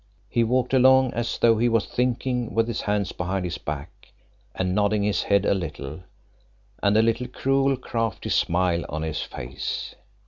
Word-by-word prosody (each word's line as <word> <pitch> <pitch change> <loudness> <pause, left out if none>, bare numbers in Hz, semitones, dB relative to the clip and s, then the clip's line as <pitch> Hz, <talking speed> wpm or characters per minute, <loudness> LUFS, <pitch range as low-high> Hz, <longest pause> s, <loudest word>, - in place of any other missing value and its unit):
He 120 - +2
walked 125 +2 0
along 130 0 +5
as 120 0 -2
though 115 -2 +4
he 120 +1 +3
was 115 -2 +2
thinking, 125 -2 -1
with 115 0 +2
his 115 - -2
hands 105 -2 -1
behind 90 +1 -2
his 90 0 -4
back, 75 +7 -7 0.4
and 90 -1 -1
nodding 105 +1 +2
his 105 0 +1
head 100 0 +2
a - - +3
little, 75 -5 -5 0.8
and 100 +1 +3
a 110 - +5
little 115 +2 0
cruel, 135 +1 +1
crafty 115 -5 -3
smile 85 -1 +1
on 80 +1 -3
his 80 -2 -2
face. 60 +3 -5
105 Hz, 170 wpm, -24 LUFS, 90-120 Hz, 0.8 s, along